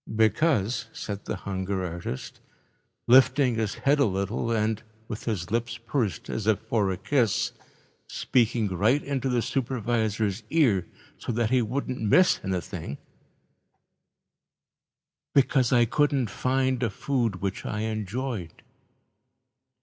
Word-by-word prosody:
"Because," 115 - +2
said 100 -1 -6
the - - -2
hunger 95 -1 -3
artist, 85 -6 -6 0.7
lifting 130 +1 +5
his 110 -2 -1
head 145 +2 +2
a 140 - +5
little 100 +3 -1
and, 110 -1 0 0.3
with 110 -2 -6
his 100 -7 -3
lips 120 0 -1
pursed 115 - -2
as 110 -1 -3
if 110 -3 +4
for 110 -2 0
a 95 - -2
kiss, 120 -2 +1 0.6
speaking 120 -3 +1
right 110 +10 +2
into 135 -2 -2
the 120 -2 +1
supervisor's 110 -5 -1
ear 115 - +3 0.3
so - - -3
that 115 0 0
he 130 -1 +4
wouldn't 125 +2 -3
miss 180 - +4
anything, 90 -5 -4 2.4
"because 135 -2 +3
I 120 -2 +5
couldn't 135 -2 +1
find 130 0 0
a 115 - +1
food 120 -1 -1
which 95 +1 -4
I 105 - -3
enjoyed. 110 -3 -4
115 Hz, 125 wpm, -26 LUFS, 100-130 Hz, 2.4 s, lifting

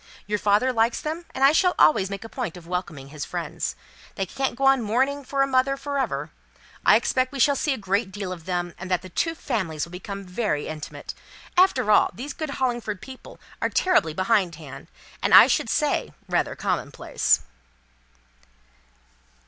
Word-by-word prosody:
Your 210 +1 -1
father 210 +6 +2
likes 230 0 +2
them, 320 +3 -4
and 265 - -1
I 275 - +8
shall 360 +3 +3
always 155 +5 +4
make 200 +1 -6
a - - -7
point 225 -8 -5
of 175 - -13
welcoming 170 -6 -5
his 150 0 -6
friends. 60 - -4 0.4
They 195 - -1
can't 265 +7 -2
go 270 +3 -1
on 270 -1 +5
mourning 265 +6 0
for 275 +1 0
a - - 0
mother 270 +1 +2
for 280 0 -3
ever. 265 - -2 0.5
I - - +6
expect 255 0 +1
we 280 - -6
shall 280 +3 +4
see 290 - 0
a 265 - 0
great 200 0 -1
deal 195 -2 -5
of 170 -3 -11
them; 175 -1 -2
and 185 +1 -7
that 180 -1 0
the 185 - -9
two 330 - -1
families 185 - -2
will 170 - -15
become 200 +2 -7
very 180 -5 -2
intimate. 155 -1 -7 0.4
After 270 - +4
all, 210 - +5
these 270 +8 -6
good 310 -2 -5
Hollingford 240 -6 -1
people 260 +4 -12 0.2
are - - +1
terribly 355 - +2
behindhand, 170 - -1 0.3
and - - +5
I - - +11
should - - 0
say, - - 0
rather - - 0
commonplace." - - 0
215 Hz, 180 wpm, -24 LUFS, 180-270 Hz, 0.5 s, I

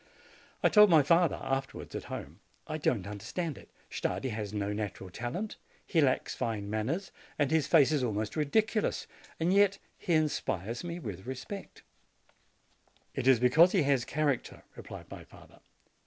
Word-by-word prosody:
I - - +6
told 210 -1 +7
my 160 -4 +6
father 170 +3 +4
afterwards, 135 0 -3
at - - -5
home: - - -7 0.3
"I 155 0 -4
don't 110 -10 0
understand 135 - -4
it; - - -14 0.2
Stardi 130 - -2
has 105 -3 -4
no 105 -1 -2
natural 105 -3 -5
talent, 125 - -4 0.3
he 165 - +2
lacks 130 -3 +1
fine 105 -3 -3
manners, 135 - -2 0.3
and 145 -2 +1
his 160 -3 +2
face 155 -4 +5
is 145 -4 +1
almost 110 -2 -2
ridiculous; 215 +9 +1 0.3
yet 195 +4 +4 0.2
he 175 - -1
inspires 120 - 0
me 170 0 -4
with 105 - -7
respect." 130 +10 -7 1.3
"It 125 - -2
is 130 -3 +6
because 155 +9 +5
he 185 -6 +4
has 140 -3 +2
character," 140 0 -1
replied - - -9
my - - -8
father. - - -17
140 Hz, 155 wpm, -30 LUFS, 110-170 Hz, 1.3 s, told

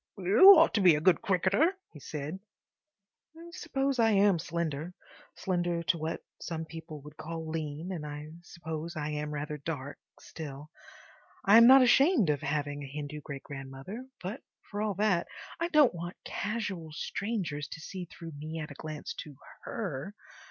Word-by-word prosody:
"YOU 210 - +9
ought 325 +1 +5
to 205 - +2
be 180 -4 +7
a - - 0
good 175 +2 +4
cricketer," 200 - +2 0.2
he 150 - -11
said. 150 +5 -5 1.0
I 340 +1 -11
suppose 275 -7 -1
I 225 -1 +5
am 200 -4 +4
slender, 170 0 -3 0.4
slender 175 -2 -1
to 170 - +1
what 160 +1 -3 0.2
some 160 -1 -4
people 160 -2 -9
would 150 +1 -12
call 160 +1 -6
lean, 160 +2 -4
and 170 -5 -4
I 150 0 -7
suppose 170 -1 -6
I 150 -1 -3
am 150 0 -3
rather 150 +1 -4
dark, 145 -2 -5 0.2
still—I 155 +6 -4
am 230 0 +9
not 265 +1 +9
ashamed 260 - +5
of 145 - -2
having 145 0 -2
a 140 - -6
Hindu 150 +2 -6
great 140 -1 -7
grandmother, 135 - -8 0.2
but, 200 +8 -5 0.3
for 205 0 -3
all 210 -2 -1
that, 195 -3 +1 0.3
I 335 - +1
don't 300 - +5
want 175 +1 -6
casual 200 -6 -3
strangers 175 -5 -3
to - - -8
see 180 +3 -6
through 165 -1 -10
me 155 +2 -7
at 150 -1 -6
a 145 - -10
glance 155 -1 -6
to 150 -2 -8 0.3
HER. 195 - -4
165 Hz, 165 wpm, -30 LUFS, 150-200 Hz, 1.0 s, YOU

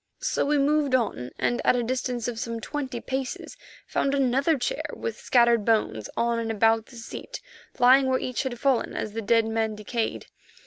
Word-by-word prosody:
So - - -1
we 295 0 +3
moved 285 -1 +2
on, 205 - -1
and 240 - 0
at - - +4
a 245 - 0
distance 250 -1 -2
of 235 -2 -4
some 230 0 -3
twenty 260 0 -4
paces 265 +1 -4 0.3
found 275 0 0
another 275 +4 +2
chair - - -2
with 465 - -5
scattered 235 -3 +3
bones 205 - 0
on 235 0 +1
and 225 -1 -3
about 225 +1 +2
the 250 - -15
seat, 235 - -8 0.4
lying 260 +2 +6
where 260 0 +2
each 255 -1 -2
had 260 -3 -4
fallen 270 -3 +1
as 210 - -4
the 225 - -3
dead 225 +2 +3
man 220 -1 -1
decayed. 220 +2 -3
240 Hz, 185 wpm, -26 LUFS, 225-265 Hz, 0.4 s, lying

